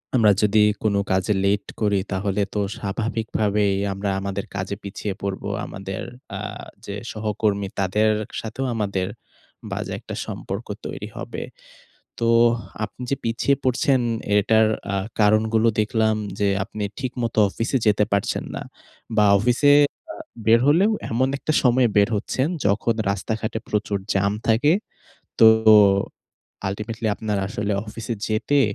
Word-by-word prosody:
আমরা 110 -4 +6
যদি 105 0 +4 0.2
কোন 105 -2 +2 0.2
কাজে 95 +2 +2
লেট 100 +1 +1 0.2
করি 105 -2 +2
তাহলে 100 +1 -1
তো 105 - -1 0.2
স্বাভাবিকভাবেই 105 -1 0 0.2
আমরা 100 +1 -3
আমাদের 100 0 -4
কাজে 95 +1 -3
পিছিয়ে 100 0 -4
পড়বো। 100 -1 -3 0.2
আমাদের 95 0 -6 0.4
আ - - -5 0.5
যে 100 - -5 0.2
সহকর্মী 105 -2 -1
তাদের 105 +3 +2 0.3
সাথেও 115 +4 -4
আমাদের 100 -4 -1 0.6
বাজে - - -4
একটা - - -8
সম্পর্ক - - -6 0.2
তৈরি - - -5
হবে। - - -5 0.8
তো 115 - +1 0.6
আপনি 105 - -14
যে 140 - +1
পিছিয়ে 115 +4 +1
পড়ছেন 130 +1 +2 0.4
এটার 110 +2 +4 0.3
আ - - +1 0.3
কারণগুলো 110 +2 +3
দেখলাম 110 0 +2 0.2
যে, 100 - +2 0.2
আপনি 105 +2 -6 0.2
ঠিকমতো 120 -4 -2
অফিসে 115 +6 -1
যেতে 105 0 +4
পারছেন 100 -1 0
না - - -5 0.5
বা, 105 - +5
অফিসে 125 +7 +3 0.4
আ - - -9 0.3
বের 115 +2 +6
হলেও 180 +9 +4 0.2
এমন 125 +3 +2
একটা 155 - -2
সময় 125 -1 +4
বের 100 +2 +5
হচ্ছেন, 130 +6 -1 0.2
যখন 105 +3 +2 0.2
রাস্তাঘাটে 110 +3 -2
প্রচুর 105 -1 0 0.2
জাম 100 0 +2 0.2
থাকে। 120 +8 +4 0.7
তো - - +8 0.3
ও - - +9 0.9
আল্টিমেটলি 110 +3 -4
আপনার 105 -1 -2
আসলে 105 -1 -2
অফিসে 115 +2 -5
যেতে 115 +6 +2
105 Hz, 135 wpm, -23 LUFS, 100-115 Hz, 0.9 s, ও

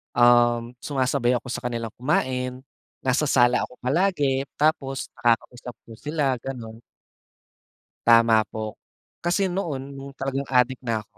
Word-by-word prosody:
um, 120 -1 +4
sumasabay 130 -3 0
ako 125 0 -4
sa - - -3
kanilang 115 -2 -4
kumain. 130 -1 -1 0.4
Nasa 135 +3 +1
sala 125 -2 +4
ako 125 - -17
palagi, 140 -2 +1
tapos 140 -3 0
nakakausap 120 +1 0
ko - - -16
sila 145 -4 -1
gano'n. 115 -3 -7 1.3
Tama 115 -1 +6
po, 110 0 -6 0.4
kasi 180 +2 0
noon 145 -8 -3
no'ng 135 0 -9
talagang 135 0 -3
adik 125 0 +2
na 115 -3 -1
ako - - -31
130 Hz, 130 wpm, -24 LUFS, 120-140 Hz, 1.3 s, Tama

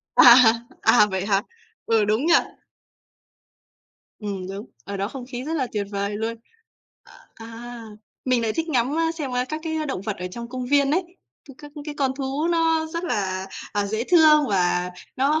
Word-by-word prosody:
À, 240 -1 +10 0.5
à, 225 -1 +6
vậy 190 0 -2
hả? 200 -1 +2 0.4
Ừ, 225 -2 +3
đúng 215 +7 +1
nhỉ? 340 - +4 1.9
Ừm, 200 -3 -5
đúng. 200 +3 -6 0.2
Ở 200 - -6
đó 195 +1 -1
không 250 +2 -8
khí 245 0 -5
rất 310 +4 -4
là 260 -3 -1
tuyệt 205 -2 -2
vời 200 +1 -2
luôn. 225 +1 -2 1.0
Ờ, 225 - -11
a, 235 +1 -9 0.4
mình 255 -2 +2
lại 220 -1 0
thích 325 +5 -3
ngắm, 265 +1 +1
a, 325 0 +1
xem, 300 -6 -5
a, 250 0 0
các 310 +4 -5
cái 315 -1 -2
động 265 -9 -3
vật 205 +1 -4
ở 180 - -5
trong 235 +4 -7
công 255 0 -5
viên 280 +1 +3
ấy, 350 +5 +1 0.4
các 275 - -13
các 295 -1 -12
cái 300 -1 -6
con 270 -2 +2
thú 275 +4 -1
nó 325 -1 +2
rất 335 +2 -5
là, 190 - -2 0.3
à, 205 -1 0
dễ 220 +3 -2
thương 310 -4 +6
và 180 -2 +1 0.3
nó 285 +4 +2
245 Hz, 190 wpm, -23 LUFS, 205-300 Hz, 1.9 s, À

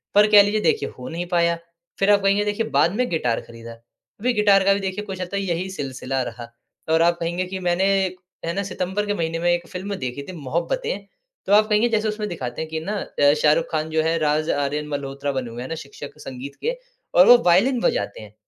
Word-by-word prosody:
पर 205 +1 +7
कह 205 -1 +9
लीजिए 210 +1 0
देखिए 440 -1 +1
हो 125 - -8
नहीं 170 +2 -4
पाया। 170 -1 +2 0.4
फिर 195 +1 +4
आप 205 - +4
कहेंगे 200 +1 +3
देखिए 210 +2 -1
बाद 170 +4 +2
में 250 +2 +1
गिटार 125 -8 0
खरीदा। 115 0 -11 0.5
अभी 245 +4 +1
गिटार 205 -3 +4
का 195 - +5
भी 200 - -1
देखिए 195 +2 -4
कुछ 190 -2 -6
यही 185 -1 -2
सिलसिला 135 -5 -3
रहा। 120 0 -8 0.4
और 165 - +4
आप 170 0 +3
कहेंगे 170 +2 -2
कि 190 +1 -5
मैंने 175 0 +1 0.6
है 165 - -1
ना 200 - -2
सितंबर 190 +2 -2
के 205 - -1
महीने 165 -3 -2
में 175 +1 +1
एक 175 0 -1
फिल्म 195 +2 -5
देखी 130 -3 -5
थी - - -6
मोहब्बतें, 450 - -2 0.4
तो 200 - +1
आप 215 +1 +6
कहेंगे 215 +3 +3
जैसे 220 -1 +1
उसमें 215 0 -2
दिखाते 130 -6 -5
हैं 160 - -5
कि 160 0 -3
ना 200 +6 -4
अ, 145 0 +2
शाहरुख 155 +2 +4
खान 155 -1 -1
जो 160 0 +1
है, 165 +1 +1
राज 155 +1 +1
आर्यन 145 +1 -1
मल्होत्रा 140 -1 -3
बने 130 -3 -3
हुए 120 +1 -7
है 130 - -5
ना 165 - -3
शिक्षक 140 +1 -11
संगीत 135 +2 -8
के - - -1 0.4
और - - +7
वो 245 - +10
वायलिन 215 +9 +4
बजाते 100 +1 -1
हैं। 105 -1 -12
175 Hz, 225 wpm, -22 LUFS, 145-205 Hz, 0.6 s, वो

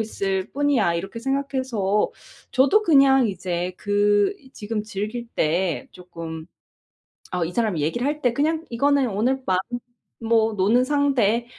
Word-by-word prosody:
있을 195 -3 -2
뿐이야.' 280 -11 +1
이렇게 195 +7 -5
생각해서 260 -6 -1 0.4
저도 280 +12 +4
그냥 275 - +5
이제 180 -2 -3
그 205 - +2 0.2
지금 215 -2 -4
즐길 215 +3 -5
때 170 +2 0
조금 165 -3 -8 0.9
어 180 -2 -1
이 165 - -5
사람이 215 -6 0
얘기를 240 - -1
할 300 +1 -2
때 245 -2 +2
'그냥 315 +5 0
이거는 280 +2 +2
오늘 250 +6 0
밤 185 -1 +2 0.6
뭐 225 -1 +2
노는 210 +5 +3
상대.' 255 -5 +1
225 Hz, 255 characters per minute, -23 LUFS, 190-270 Hz, 0.9 s, 그냥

